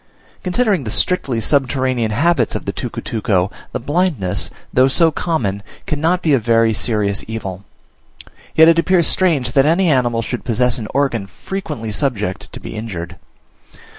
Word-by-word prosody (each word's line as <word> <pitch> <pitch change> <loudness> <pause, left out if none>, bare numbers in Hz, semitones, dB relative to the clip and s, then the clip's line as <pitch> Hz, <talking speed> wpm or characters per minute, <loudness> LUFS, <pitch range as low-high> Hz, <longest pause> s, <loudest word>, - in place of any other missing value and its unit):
Considering 195 - +1
the 110 - -4
strictly 135 - 0
subterranean 130 -2 +1
habits 160 +11 +1
of - - -4
the - - -2
tucutuco, 100 -4 -1 0.2
the - - -3
blindness, 145 - -1 0.2
though 130 +1 +5
so 160 +4 +3
common, 120 - -1 0.2
cannot 165 +4 0
be 155 - +3
a 135 - +4
very 115 0 +3
serious 105 -2 -1
evil; 100 -4 -5 0.9
yet 160 0 +7
it 165 0 +5
appears 175 -1 +3
strange 155 -11 +2
that 135 +2 +3
any 170 +3 +3
animal 120 -4 +1
should 125 +2 -4
possess 125 +1 +1
an 110 - -5
organ 125 -8 0
frequently 150 - -6
subject 105 -6 -2
to - - -8
be - - -8
injured. 90 -5 -6
125 Hz, 150 wpm, -18 LUFS, 110-160 Hz, 0.9 s, yet